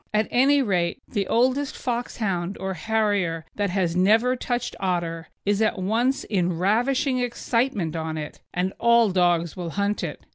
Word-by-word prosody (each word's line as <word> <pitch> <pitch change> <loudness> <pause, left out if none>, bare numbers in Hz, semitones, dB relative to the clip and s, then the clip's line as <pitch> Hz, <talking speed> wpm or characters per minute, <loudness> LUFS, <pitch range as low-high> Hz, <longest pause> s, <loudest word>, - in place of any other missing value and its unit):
At 215 0 +2
any 275 +3 +4
rate, 180 -2 0
the 200 -4 -2
oldest 260 +4 +1
Foxhound 205 -7 -2
or 190 0 -3
Harrier 205 -6 0
that 205 -1 -1
has 180 -2 0
never 220 +7 +4
touched 245 -1 -3
otter 170 -3 -2 0.2
is 205 +1 +1
at 215 -1 +2
once 230 +8 0
in 180 -4 0
ravishing 255 - +1
excitement 235 - -1
on 160 -1 -3
it, 150 -1 -6
and 185 +2 -1
all 235 -2 +4
dogs 175 -3 +2
will 175 -2 -4
hunt 200 +4 -1
it. - - -6
205 Hz, 155 wpm, -24 LUFS, 180-240 Hz, 0.2 s, any